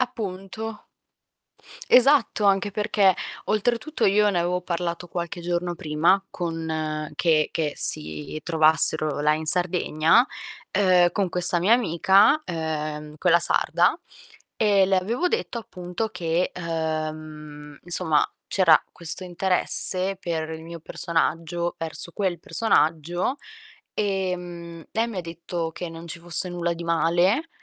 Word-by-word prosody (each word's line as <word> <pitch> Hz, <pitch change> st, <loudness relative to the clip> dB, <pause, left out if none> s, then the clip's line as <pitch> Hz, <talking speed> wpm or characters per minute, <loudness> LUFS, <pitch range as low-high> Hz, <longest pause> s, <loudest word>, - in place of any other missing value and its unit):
Appunto. 220 Hz, -3 st, -5 dB, 1.1 s
Esatto, 250 Hz, -4 st, +4 dB
anche 195 Hz, 0 st, +2 dB
perché 210 Hz, -3 st, +2 dB, 0.3 s
oltretutto 235 Hz, +8 st, -1 dB
io 210 Hz, +2 st, +3 dB
ne 190 Hz, -, -1 dB
avevo 180 Hz, +1 st, -1 dB
parlato 175 Hz, 0 st, -4 dB
qualche 175 Hz, 0 st, -5 dB
giorno 175 Hz, 0 st, -2 dB
prima 170 Hz, +3 st, +1 dB
con 160 Hz, -3 st, -4 dB
che 155 Hz, -1 st, +2 dB
che 155 Hz, -3 st, -2 dB
si 75 Hz, -, +1 dB
trovassero 155 Hz, -2 st, +4 dB
là 150 Hz, +1 st, +2 dB
in 155 Hz, +1 st, -4 dB
Sardegna, 175 Hz, +3 st, +3 dB, 0.5 s
uhm, 180 Hz, -3 st, +4 dB
con 195 Hz, +2 st, -1 dB
questa 180 Hz, 0 st, +3 dB
mia 195 Hz, +7 st, +3 dB
amica, 200 Hz, -, +3 dB
uhm, 155 Hz, -2 st, -5 dB
quella 170 Hz, 0 st, +3 dB
sarda, 170 Hz, -, +2 dB, 0.6 s
e 205 Hz, -3 st, +3 dB
le 190 Hz, 0 st, +1 dB
avevo 230 Hz, -, -2 dB
detto 455 Hz, -, -3 dB
appunto 185 Hz, -2 st, -5 dB
che, 175 Hz, -2 st, -2 dB
uhm, 155 Hz, -3 st, -5 dB
insomma 165 Hz, -3 st, 0 dB, 0.2 s
c'era 175 Hz, -5 st, +4 dB
questo 170 Hz, +2 st, +3 dB
interesse 185 Hz, +1 st, 0 dB
per 160 Hz, -3 st, -3 dB
il 160 Hz, 0 st, -7 dB
mio 165 Hz, 0 st, -9 dB
personaggio, 170 Hz, +1 st, -2 dB
verso 165 Hz, +1 st, -3 dB
quel 185 Hz, -4 st, -2 dB
personaggio, 175 Hz, -, 0 dB, 0.6 s
ehm, 180 Hz, -4 st, -4 dB
lei 225 Hz, +1 st, 0 dB
mi 200 Hz, -5 st, -4 dB
detto 170 Hz, 0 st, -5 dB
che 175 Hz, +1 st, -6 dB
non 165 Hz, +1 st, -10 dB
ci 170 Hz, -, -6 dB
fosse 170 Hz, +1 st, +4 dB
nulla 175 Hz, -1 st, -2 dB
di 170 Hz, -, -8 dB
male, 175 Hz, -, +1 dB
175 Hz, 125 wpm, -24 LUFS, 160-195 Hz, 1.1 s, Esatto